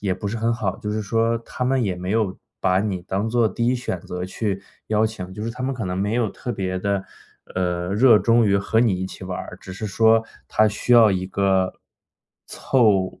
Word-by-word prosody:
也 100 Hz, -3 st, 0 dB
不 100 Hz, -, -6 dB
是 115 Hz, -, -3 dB
很 115 Hz, +1 st, +1 dB
好， 115 Hz, -, -2 dB
就 105 Hz, -2 st, -4 dB
是 110 Hz, -, -1 dB
说 115 Hz, +2 st, +1 dB
他 120 Hz, +2 st, -5 dB
们 130 Hz, 0 st, +2 dB
也 100 Hz, -5 st, 0 dB
没 90 Hz, +1 st, -5 dB
有 105 Hz, -3 st, 0 dB, 0.2 s
把 95 Hz, 0 st, +2 dB
你 100 Hz, -3 st, -2 dB
当 100 Hz, +4 st, -2 dB
做 115 Hz, -1 st, +2 dB
第 115 Hz, +4 st, -2 dB
1 125 Hz, -, +3 dB
选 95 Hz, -7 st, -4 dB
择 90 Hz, +1 st, -5 dB
去 95 Hz, +1 st, -3 dB, 0.3 s
邀 110 Hz, 0 st, +3 dB
请， 95 Hz, -4 st, -7 dB
就 105 Hz, -, -6 dB
是 115 Hz, -, -2 dB
他 125 Hz, +2 st, -7 dB
们 135 Hz, -, -1 dB
可 115 Hz, -5 st, -4 dB
能 90 Hz, 0 st, -3 dB
没 105 Hz, +3 st, 0 dB
有 115 Hz, -4 st, +1 dB
特 125 Hz, -, -5 dB
别 95 Hz, -3 st, -2 dB
地， 100 Hz, 0 st, -1 dB, 0.5 s
呃， 90 Hz, -1 st, -1 dB
热 115 Hz, +1 st, +6 dB
衷 115 Hz, -1 st, +4 dB
于 100 Hz, 0 st, +3 dB
和 100 Hz, +3 st, 0 dB
你 110 Hz, -6 st, +3 dB
一 -, -, -1 dB
起 95 Hz, 0 st, -8 dB
玩 90 Hz, -1 st, -4 dB
儿， -, -, -8 dB
只 95 Hz, -, -9 dB
是 95 Hz, +4 st, -6 dB
说 110 Hz, +2 st, +4 dB, 0.2 s
他 110 Hz, 0 st, +3 dB
需 105 Hz, +4 st, -1 dB
要 115 Hz, -3 st, +8 dB
一 95 Hz, -1 st, -1 dB
个， 95 Hz, -1 st, +1 dB, 0.7 s
凑 105 Hz, -8 st, +1 dB
105 Hz, 240 characters per minute, -22 LUFS, 95-115 Hz, 0.7 s, 要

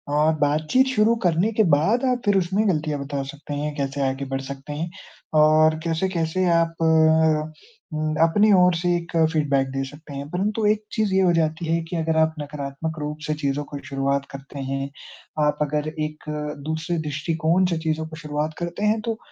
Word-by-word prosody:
और 155 Hz, +2 st, +4 dB
बातचीत 155 Hz, -, +3 dB
शुरू 215 Hz, +2 st, +4 dB
करने 175 Hz, +5 st, +2 dB
के 220 Hz, -, +3 dB
बाद 210 Hz, -, +1 dB
आप 250 Hz, -1 st, +1 dB
फिर 205 Hz, -1 st, +4 dB
उसमें 190 Hz, +4 st, +1 dB
गलतियाँ 150 Hz, -4 st, -1 dB
बता 140 Hz, 0 st, -3 dB
सकते 145 Hz, 0 st, -8 dB
हैं 150 Hz, +1 st, -2 dB
कैसे 140 Hz, 0 st, -2 dB
आगे 135 Hz, +1 st, -3 dB
बढ़ 135 Hz, 0 st, -3 dB
सकते 140 Hz, +2 st, -7 dB
हैं, 165 Hz, +4 st, -3 dB, 0.4 s
और 155 Hz, +1 st, +5 dB
कैसे-कैसे 170 Hz, +1 st, 0 dB
आप 165 Hz, 0 st, 0 dB
अ, 160 Hz, -1 st, +3 dB, 0.4 s
हुँ 155 Hz, 0 st, -1 dB
अपनी 205 Hz, +6 st, +4 dB
ओर 180 Hz, -1 st, +5 dB
से 175 Hz, +1 st, +1 dB
एक 170 Hz, 0 st, -4 dB, 0.2 s
फ़ीडबैक 140 Hz, -3 st, +1 dB
दे 135 Hz, 0 st, -2 dB
सकते 145 Hz, +1 st, -12 dB
हैं। 140 Hz, +1 st, -5 dB
परंतु 210 Hz, +5 st, -1 dB
एक 210 Hz, 0 st, +2 dB
चीज़ 215 Hz, -3 st, 0 dB
ये 190 Hz, -, +4 dB
हो 180 Hz, -2 st, +4 dB
जाती 160 Hz, 0 st, 0 dB
है 165 Hz, +1 st, +1 dB
कि -, -, -4 dB
अगर 160 Hz, 0 st, 0 dB
आप 160 Hz, 0 st, +3 dB
नकारात्मक 145 Hz, +2 st, -5 dB
रूप 150 Hz, 0 st, -4 dB
से 155 Hz, -, +1 dB
चीज़ों 140 Hz, 0 st, 0 dB
को 145 Hz, -, -8 dB
शुरुआत 140 Hz, -2 st, -1 dB
करते 140 Hz, +1 st, -9 dB
हैं, 135 Hz, 0 st, -3 dB, 0.5 s
आप 150 Hz, 0 st, +2 dB
अगर 150 Hz, +1 st, 0 dB
एक 155 Hz, -1 st, -5 dB, 0.4 s
दूसरे 160 Hz, +3 st, -2 dB
दृष्टिकोण 160 Hz, +4 st, 0 dB
से 170 Hz, -, 0 dB
चीज़ों 160 Hz, 0 st, -1 dB
को 160 Hz, -, -9 dB
शुरुआत 150 Hz, 0 st, -3 dB
करते 175 Hz, +3 st, -4 dB
हैं 215 Hz, +1 st, +2 dB
तो 225 Hz, -1 st, -2 dB
155 Hz, 190 wpm, -23 LUFS, 145-175 Hz, 0.5 s, और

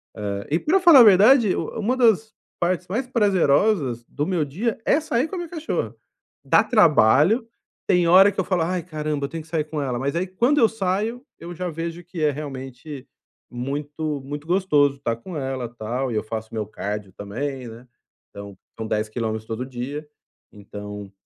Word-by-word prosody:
hã, 100 Hz, -1 st, -4 dB
e 160 Hz, -, +2 dB
pra 375 Hz, +6 st, +2 dB
falar 340 Hz, -7 st, +8 dB
a -, -, +10 dB
verdade 215 Hz, +2 st, +6 dB
u -, -, -3 dB
uma 225 Hz, +4 st, 0 dB
das 220 Hz, -3 st, +3 dB, 0.3 s
partes 175 Hz, +1 st, -1 dB
mais 235 Hz, +8 st, -2 dB
prazerosas 185 Hz, -, +2 dB
do 145 Hz, -, -3 dB
meu 175 Hz, -4 st, 0 dB
dia 205 Hz, -, -2 dB
é 300 Hz, -, +3 dB
sair 270 Hz, -3 st, -1 dB
com 375 Hz, -, -7 dB
a -, -, -4 dB
minha 345 Hz, -2 st, -5 dB
cachorra, 320 Hz, -2 st, -3 dB, 0.5 s
dá -, -, +5 dB
trabalho, 175 Hz, -, +4 dB, 0.4 s
tem 175 Hz, -2 st, +3 dB
hora 190 Hz, +4 st, +7 dB
que 200 Hz, -, -7 dB
eu 190 Hz, -, +2 dB
falo: 185 Hz, -3 st, 0 dB
"Ai, 180 Hz, +1 st, -1 dB
caramba, 150 Hz, -4 st, -3 dB
eu 140 Hz, -, -6 dB
tenho 165 Hz, -1 st, -6 dB
que 160 Hz, -, -20 dB
sair 160 Hz, -2 st, 0 dB
com 155 Hz, -1 st, -4 dB
ela", 125 Hz, -3 st, -2 dB
mas 140 Hz, +3 st, -2 dB
aí, 175 Hz, +2 st, 0 dB
quando 240 Hz, +10 st, +1 dB
eu 225 Hz, -, +5 dB
saio, 220 Hz, +4 st, -2 dB
eu 170 Hz, +1 st, -8 dB
já 180 Hz, +1 st, -3 dB
vejo 165 Hz, +2 st, -5 dB
que 175 Hz, -1 st, -8 dB
é 150 Hz, -, +3 dB
realmente 135 Hz, -1 st, -8 dB, 0.4 s
muito, 145 Hz, +3 st, -4 dB
muito 145 Hz, +3 st, -7 dB
gostoso 150 Hz, -7 st, +2 dB
tá 115 Hz, -4 st, -1 dB
com 155 Hz, +8 st, -8 dB
ela, 130 Hz, -3 st, -3 dB
tal, 120 Hz, +3 st, -4 dB
e -, -, -3 dB
eu 105 Hz, -, 0 dB
faço 110 Hz, 0 st, -6 dB
meu 110 Hz, -1 st, -2 dB
cardio 105 Hz, -2 st, -5 dB
também, 125 Hz, +6 st, -5 dB
né, 115 Hz, +3 st, -12 dB, 0.4 s
então 100 Hz, -1 st, -10 dB, 0.2 s
são 110 Hz, -1 st, -4 dB
10 105 Hz, 0 st, -1 dB
km 110 Hz, -1 st, -3 dB
todo 115 Hz, +3 st, -4 dB
dia. 135 Hz, +4 st, -6 dB, 0.4 s
Então, 105 Hz, -1 st, -9 dB
150 Hz, 190 wpm, -23 LUFS, 125-190 Hz, 0.5 s, a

